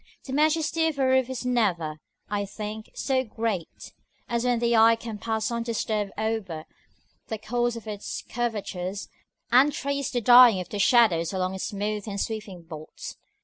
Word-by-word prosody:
The 265 Hz, -, -6 dB
majesty 315 Hz, +2 st, +2 dB
of 310 Hz, -3 st, -2 dB
a 270 Hz, -, +2 dB
roof 260 Hz, -1 st, +3 dB
is 255 Hz, -1 st, -4 dB
never, 180 Hz, -11 st, 0 dB, 0.3 s
I 205 Hz, 0 st, -1 dB
think, 215 Hz, +2 st, -6 dB
so 260 Hz, -1 st, 0 dB
great, 220 Hz, -7 st, -4 dB, 0.3 s
as 235 Hz, 0 st, -1 dB
when 245 Hz, -1 st, +2 dB
the 235 Hz, 0 st, +2 dB
eye 225 Hz, +1 st, +7 dB
can 225 Hz, -2 st, -7 dB
pass 220 Hz, 0 st, -1 dB
undisturbed 225 Hz, -3 st, -1 dB
over 210 Hz, -8 st, -2 dB, 0.6 s
the 220 Hz, -, -3 dB
course 240 Hz, +2 st, -1 dB
of 230 Hz, -, -8 dB
all 215 Hz, -, -2 dB
its 205 Hz, -, -6 dB
curvatures, 200 Hz, -5 st, -3 dB, 0.4 s
and 260 Hz, +5 st, +6 dB
trace 280 Hz, -1 st, -2 dB
the 245 Hz, -, -1 dB
dying 240 Hz, -3 st, +8 dB
of 180 Hz, -1 st, -6 dB
the 205 Hz, -, -4 dB
shadows 195 Hz, -7 st, +4 dB
along 185 Hz, 0 st, -1 dB
its 190 Hz, -, -4 dB
smooth 210 Hz, 0 st, -3 dB
and 200 Hz, -1 st, -4 dB
sweeping 210 Hz, -6 st, -4 dB
vaults. 155 Hz, -2 st, -9 dB
220 Hz, 170 wpm, -26 LUFS, 200-245 Hz, 0.6 s, dying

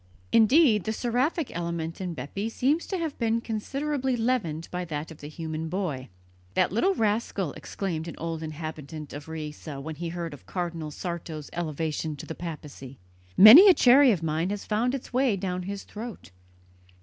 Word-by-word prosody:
Indeed, 225 Hz, -, +5 dB
the 220 Hz, -, -1 dB
seraphic 255 Hz, +7 st, -1 dB
element 170 Hz, 0 st, -3 dB
in 180 Hz, -3 st, -4 dB
Bepi 200 Hz, +9 st, -4 dB
seems 280 Hz, +8 st, 0 dB
to 385 Hz, -, -2 dB
have 325 Hz, -4 st, -3 dB
been 230 Hz, -1 st, +1 dB
considerably 265 Hz, +4 st, -2 dB
leavened 225 Hz, -10 st, -1 dB
by 180 Hz, 0 st, -3 dB
that 155 Hz, -1 st, -5 dB
of 160 Hz, -, -12 dB
the 145 Hz, -, -8 dB
human 160 Hz, +1 st, -5 dB
boy. 160 Hz, -8 st, -3 dB, 0.5 s
"That -, -, +3 dB
little 370 Hz, -, +2 dB
rascal!" 205 Hz, -6 st, 0 dB
exclaimed 170 Hz, -5 st, -4 dB
an 165 Hz, -, -6 dB
old 165 Hz, -1 st, -4 dB
inhabitant 155 Hz, -1 st, -7 dB
of 145 Hz, +2 st, -8 dB
Riese 155 Hz, -1 st, -7 dB
when 150 Hz, +1 st, -6 dB
he 170 Hz, 0 st, -4 dB
heard 170 Hz, -2 st, -5 dB
of 145 Hz, -, -13 dB
Cardinal 170 Hz, -4 st, -3 dB
Sarto's 160 Hz, -2 st, -6 dB
elevation 160 Hz, -1 st, -3 dB
to 145 Hz, -, -9 dB
the -, -, -5 dB
papacy, 150 Hz, -6 st, -8 dB, 0.4 s
"Many 265 Hz, -, +11 dB
a 365 Hz, -, +7 dB
cherry 260 Hz, +1 st, +7 dB
of 175 Hz, -6 st, -1 dB
mine 160 Hz, +3 st, 0 dB
has 205 Hz, 0 st, -4 dB
found 235 Hz, +5 st, 0 dB
its 255 Hz, -, -8 dB
way 255 Hz, -4 st, +3 dB
down 185 Hz, -1 st, -3 dB
his 200 Hz, -1 st, -5 dB
throat!" 220 Hz, -, -9 dB
175 Hz, 175 wpm, -27 LUFS, 160-230 Hz, 0.5 s, Many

